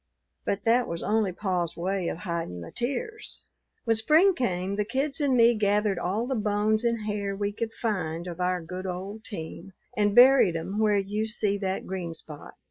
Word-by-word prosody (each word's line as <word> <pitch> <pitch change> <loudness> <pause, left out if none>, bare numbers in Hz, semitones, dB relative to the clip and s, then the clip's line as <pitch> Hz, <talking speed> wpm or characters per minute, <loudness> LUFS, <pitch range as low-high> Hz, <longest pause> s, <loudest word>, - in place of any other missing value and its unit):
But 200 0 -1
that 235 +2 +3
was 170 0 -4
only 215 -3 +1
pa's 180 -3 -2
way 185 +1 -1
of - - -3
hidin' 170 - -4
the 85 - -9
tears. 435 - -4 0.4
"When 225 -1 +2
spring 315 - +5
came 190 - -1
the 210 - +1
kids 275 +6 -2
and 270 -3 +2
me 235 0 +6
gathered 205 -3 +1
all 205 +6 -1
the 265 - -2
bones 215 0 +1
and 230 -2 0
hair 205 -2 -2
we 205 +1 -1
could 225 +2 -4
find 175 -7 -2
of 175 -1 -7
our 180 -1 0
good 185 +3 -6
old 195 +4 -5
team, 185 0 -8 0.2
and 205 -2 +2
buried 250 -8 +7
'em 190 +6 -3
where 210 -2 +3
you 205 +2 -1
see 210 -2 0
that 190 -1 -2
green 175 -3 -4
spot. 150 -2 -10
205 Hz, 190 wpm, -27 LUFS, 180-225 Hz, 0.4 s, buried